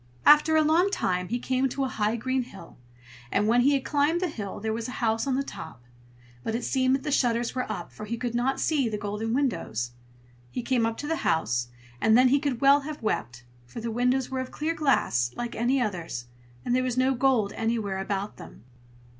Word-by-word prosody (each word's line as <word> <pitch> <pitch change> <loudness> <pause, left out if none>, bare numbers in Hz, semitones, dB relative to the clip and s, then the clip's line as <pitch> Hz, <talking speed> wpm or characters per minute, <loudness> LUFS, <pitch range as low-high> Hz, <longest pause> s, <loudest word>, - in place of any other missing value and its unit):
After 300 +1 +7
a 315 - +5
long 330 +5 +3
time 180 - -1
he 240 - -1
came 260 +2 0
to 275 +2 -2
a - - +1
high 215 -2 0
green 260 +3 -1
hill; 195 -8 -11 0.6
and 210 - +2
when 240 +2 +4
he 280 +3 +4
had 270 - -2
climbed 295 +3 +2
the 365 -1 -1
hill, 205 -9 -6
there 220 +1 -2
was 225 +1 -3
the 255 - -6
house 225 +2 0
on 265 - +1
the 275 - 0
top; 160 - -9 0.6
but 225 - -2
it 240 - -2
seemed 260 -1 +2
that 270 - -4
the 295 - -2
shutters 240 -3 +1
were 255 -1 -2
up, - - -6
for 215 - -8
he 235 +2 -3
could 240 0 -3
not 250 +3 0
see 280 -7 +1
the 215 - -3
golden 210 +2 -3
windows. 225 - -1 0.6
He 245 - -4
came 240 -3 +2
up 225 - -3
to 295 - -5
the 325 +1 0
house, 120 - 0 0.3
and 220 +1 +5
then 255 0 +6
he 280 +3 +4
could 275 -4 -2
well 280 +1 +6
have 290 -2 -7
wept, 120 - -2 0.2
for 125 - -8
the 230 0 -3
windows 250 +3 +1
were 260 - -2
of 260 0 -4
clear 315 +2 -2
glass, 250 - +1
like 240 0 -4
any 250 +4 +1
others, 175 - -3 0.4
and 245 - +1
there 255 - +3
was 255 -1 -2
no 260 +1 +3
gold 245 -5 +2
anywhere 225 -4 -1
about 195 +1 -3
them. - - -12
245 Hz, 225 wpm, -27 LUFS, 215-270 Hz, 0.6 s, After